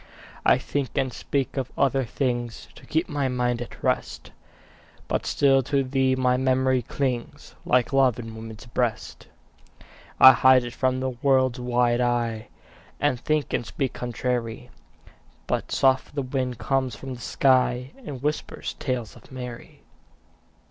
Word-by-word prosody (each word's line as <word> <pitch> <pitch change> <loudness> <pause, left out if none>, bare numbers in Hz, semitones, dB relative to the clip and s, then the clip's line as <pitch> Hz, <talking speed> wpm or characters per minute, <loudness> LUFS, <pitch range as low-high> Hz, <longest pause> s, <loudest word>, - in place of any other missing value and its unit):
I - - +5
think 140 -3 -3
and 130 -2 0
speak 135 -1 -2
of 130 -1 -2
other 135 -1 +2
things 120 -1 -3
To - - -16
keep 160 +3 0
my 145 -4 -1
mind 125 -1 -1
at 120 - -9
rest, - - -2 0.8
But - - -2
still 135 -1 +4
to 140 +1 0
thee 130 0 +1
my 125 -1 +2
memory 130 0 +2
clings 125 0 -4
Like 125 +1 +2
love 130 -4 +4
in 115 -2 -7
woman's 110 +2 -9
breast. 120 -1 -3 0.9
I 130 - +11
hide 130 +1 +5
it 120 0 -6
from 130 0 0
the 130 0 -1
world's 130 0 +2
wide 125 0 +1
eye 120 -2 -1 0.5
And 145 -4 +1
think 155 +2 -1
and - - 0
speak 130 +3 -3
contrary, 120 -1 -3 0.7
But - - -2
soft 135 +1 +2
the 140 - -1
wind 130 -2 -2
comes 135 0 -1
from 135 -1 -7
the 120 - -10
sky 125 0 +2
And 140 - -7
whispers 150 +1 -3
tales 125 -5 -3
of - - -17
Mary. 125 -2 -9
130 Hz, 150 wpm, -25 LUFS, 120-135 Hz, 0.9 s, I